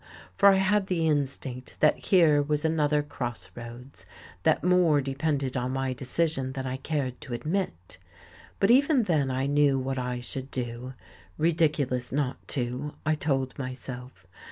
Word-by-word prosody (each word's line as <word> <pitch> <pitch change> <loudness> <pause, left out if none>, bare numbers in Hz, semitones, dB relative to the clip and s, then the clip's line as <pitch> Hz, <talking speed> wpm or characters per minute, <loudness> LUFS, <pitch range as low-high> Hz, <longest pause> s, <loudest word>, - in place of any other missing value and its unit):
For 200 - +7
I 195 - +6
had 190 +1 +2
the 170 -4 +1
instinct 135 -4 -2
that 155 - +5
here 160 -6 +4
was 150 +1 0
another 150 -2 +2
cross 120 -5 -5
roads, 120 +3 -9 0.4
that - - +2
more 180 -4 +4
depended 140 0 -1
on 125 0 -1
my 135 -1 -1
decision 130 +1 -1
than 135 -1 -4
I 130 0 -3
cared 135 -3 -3
to 120 - -5
admit. 150 - -3 0.6
But 195 - +4
even 275 0 +5
then 155 -8 +1
I 130 +1 -1
knew 145 -1 +3
what 130 0 -2
I 125 0 -3
should 130 +2 -5
do. 125 0 -5 0.4
Ridiculous 150 -6 +1
not 135 -2 -2
to 130 +2 -2
I 155 - +3
told 135 -4 -1
myself. 130 -4 -7
140 Hz, 155 wpm, -27 LUFS, 130-155 Hz, 0.6 s, For